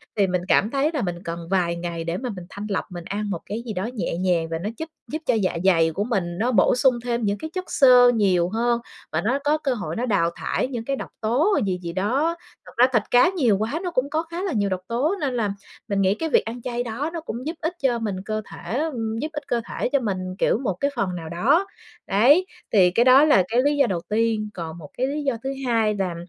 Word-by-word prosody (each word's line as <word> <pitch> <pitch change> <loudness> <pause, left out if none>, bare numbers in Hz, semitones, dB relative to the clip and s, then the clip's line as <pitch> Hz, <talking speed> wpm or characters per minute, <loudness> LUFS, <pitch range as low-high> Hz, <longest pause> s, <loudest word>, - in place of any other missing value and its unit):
thì 200 -2 +3
mình 180 -1 0
cảm 210 - +3
thấy 280 +3 +1
là 295 - -1
mình 175 -2 -4
cần 170 -1 -5
vài 175 -3 +1
ngày 170 -1 -4
để 170 +2 -2
mà 250 +2 -4
mình 180 -2 -8
thanh 205 +1 -7
lọc, 195 - -1
mình 175 -1 -7
ăn 205 +2 -3
một 175 - -2
cái 215 +3 -4
gì 220 - -4
đó 185 0 -2
nhẹ 215 -7 -2
nhàng 175 -3 +1
và 165 0 -3
nó 200 +5 -3
giúp 320 - -5 0.2
giúp 310 - -4
cho - - +2
dạ 195 -6 0
dày 165 -4 +4
của 195 +6 -2
mình 185 -7 -2
nó 235 +6 +1
bổ 205 -1 +4
sung 255 0 +4
thêm 240 -1 -1
những 205 -1 0
cái 315 - -6
chất 370 0 -3
xơ 250 -3 +7
nhiều 185 -5 +2
hơn, 235 +3 +1 0.3
và 160 - 0
nó 245 +9 0
có 295 +2 +2
cơ 280 -4 -1
hội 230 - -4
nó 240 - -1
đào 200 -8 +2
thải - - -1
những 240 -4 -5
cái 275 - -1
độc - - -7
tố 270 - +2
gì 185 -2 -1
gì 170 -1 -5
đó. 260 - 0 0.3
Thật - - -12
ra 245 +2 +7
thịt 225 -4 +3
cá 245 +8 +6
nhiều 260 - +2
quá 225 +10 -2
nó 355 - -2
cũng 270 -3 0
có 315 +2 0
khá 335 +2 -6
là 385 - -1
nhiều 205 -3 +1
độc 185 -1 -2
tố, 265 - 0
nên 275 -3 0
là 220 -5 0 0.4
mình 200 -2 0
nghĩ 190 +1 +3
cái 320 +7 -3
việc - - +3
ăn 235 +2 -6
chay 240 0 -2
đó 245 +6 -3
nó 335 - -4
cũng 250 -5 -6
giúp 320 - -2
ích 320 +3 -1
cho 245 -3 +2
mình 210 -4 -2
cơ 215 0 -2
thể - - -9 0.2
á, 310 - +1
ừm, 225 -3 -3
giúp 300 - -2
ích 295 - -6
cơ 235 - 0
thể - - -2
cho 280 - +2
mình, 205 -6 -2 0.2
kiểu, - - +2
một 225 -6 -1
cái 280 +11 -1
phần 190 -6 -1
nào 165 -2 -6
đó. 275 - +2 0.4
Đấy, 260 - +5 0.3
thì 185 -4 +5
cái 235 +7 +3
đó 260 +3 +7
là 295 -11 +5
cái 235 +4 +2
lý 290 +1 +2
do 275 -3 +4
đầu 180 -5 -2
tiên, 215 0 0
còn 165 -2 -6
một 150 -4 -11
cái 255 - +1
lý 295 +2 -3
do 270 -4 0
thứ 265 - -2 0.2
hai 225 -3 +2
là 190 -4 -2
225 Hz, 270 wpm, -23 LUFS, 190-265 Hz, 0.4 s, xơ